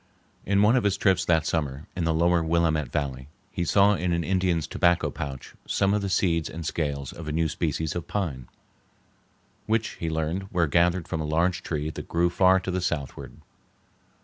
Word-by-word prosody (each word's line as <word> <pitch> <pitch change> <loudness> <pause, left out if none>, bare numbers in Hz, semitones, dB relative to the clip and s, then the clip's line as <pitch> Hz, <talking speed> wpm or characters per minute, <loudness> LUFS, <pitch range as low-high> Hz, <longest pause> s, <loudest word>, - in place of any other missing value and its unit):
In 100 +1 +3
one 110 +4 +5
of 125 - +2
his 100 -1 +1
trips 95 -2 +2
that 80 -3 +2
summer, 75 -3 -2
in 90 -3 -1
the 80 - +2
lower 85 +1 +3
Willamette 80 -2 +1
Valley, 65 -3 -3 0.2
he 85 - -2
saw 100 +4 +4
in 90 -2 -1
an 85 0 0
Indian's 90 -3 +1
tobacco 85 -2 +1
pouch 70 -5 -7
some 100 +1 +1
of 105 - +1
the 100 - -2
seeds 85 -4 +1
and 85 0 -7
scales 70 -4 -3
of 80 -1 -9
a - - -2
new 80 +1 +1
species 80 0 -2
of 85 - -4
pine, 70 -12 -3 1.2
which 110 0 +1
he 85 - -2
learned 80 +4 -2
were 85 -2 +2
gathered 85 +2 +2
from 80 -3 -3
a - - -2
large 85 +3 +1
tree 75 -1 -3
that - - -8
grew 85 +1 +1
far 95 +1 +4
to 95 - -3
the 90 0 -1
southward. 75 -7 -4
85 Hz, 195 wpm, -26 LUFS, 80-95 Hz, 1.2 s, one